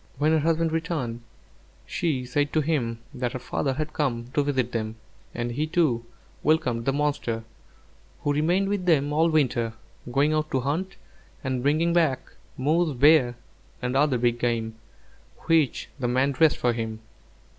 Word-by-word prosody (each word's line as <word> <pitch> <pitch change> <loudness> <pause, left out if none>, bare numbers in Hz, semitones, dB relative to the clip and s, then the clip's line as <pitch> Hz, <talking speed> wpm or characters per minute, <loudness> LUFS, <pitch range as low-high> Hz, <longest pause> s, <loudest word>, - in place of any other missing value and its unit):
When 150 +3 +2
her 160 - +4
husband 165 +1 +1
returned, 160 -8 -2 0.6
she 140 -7 -1
said 145 +3 0
to 155 - +3
him 135 -7 -1 0.2
that 125 -1 -2
her - - -2
father 135 +2 -2
had 155 +2 -4
come 120 -5 -2
to 145 - +3
visit 130 -4 0
them, 110 -2 -3 0.4
and 120 0 -2
he, 150 +6 -1
too, 155 -8 +1 0.4
welcomed 125 -7 +1
the 135 - +2
monster, 140 -6 -1 0.8
who 145 - +1
remained 175 +7 +2
with 200 -2 -1
them 150 -3 +3
all 160 +2 +3
winter, 125 -7 +1 0.4
going 145 +4 +3
out 155 0 0
to 130 - 0
hunt, 160 +9 -2 0.5
and 130 -2 -1
bringing 155 +5 +2
back 160 -7 +1 0.3
moose, 155 +1 +1
bear, 135 -3 +5 0.4
and 125 +1 -2
other 140 -2 +3
big 120 0 +1
game, 115 -2 -1 0.7
which 160 -5 +2
the 125 - 0
man 130 +3 +2
dressed 155 +3 +3
for 120 -1 +1
him. 110 -1 -4
140 Hz, 160 wpm, -26 LUFS, 120-155 Hz, 0.8 s, bear